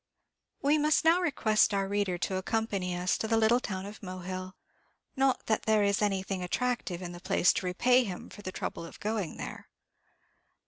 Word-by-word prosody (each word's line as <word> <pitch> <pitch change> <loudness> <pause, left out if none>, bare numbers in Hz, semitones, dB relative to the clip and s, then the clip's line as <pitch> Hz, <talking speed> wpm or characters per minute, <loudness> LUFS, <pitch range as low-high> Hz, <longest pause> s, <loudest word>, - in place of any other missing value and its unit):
We 295 +2 +4
must 305 +1 +2
now 335 +3 +5
request 220 - +2
our 195 -1 0
reader 200 -2 0
to 185 +2 -2
accompany 195 -3 -1
us 180 +1 0
to 220 - -1
the 225 0 +2
little 225 +2 +4
town 190 -5 -4
of 205 +2 -9
Mohill; 185 0 -6 0.6
not 270 -1 +1
that 220 - 0
there 215 -1 +4
is 200 0 +2
anything 195 -2 -1
attractive 190 -2 -2
in 175 - -5
the 175 - -9
place 180 - +3
to 185 - -2
repay 250 +8 +4
him 190 -6 -6
for 205 - -10
the 185 - -5
trouble 185 - -5
of 165 - -11
going 210 -5 -2
there. - - -7
200 Hz, 185 wpm, -30 LUFS, 185-225 Hz, 0.6 s, now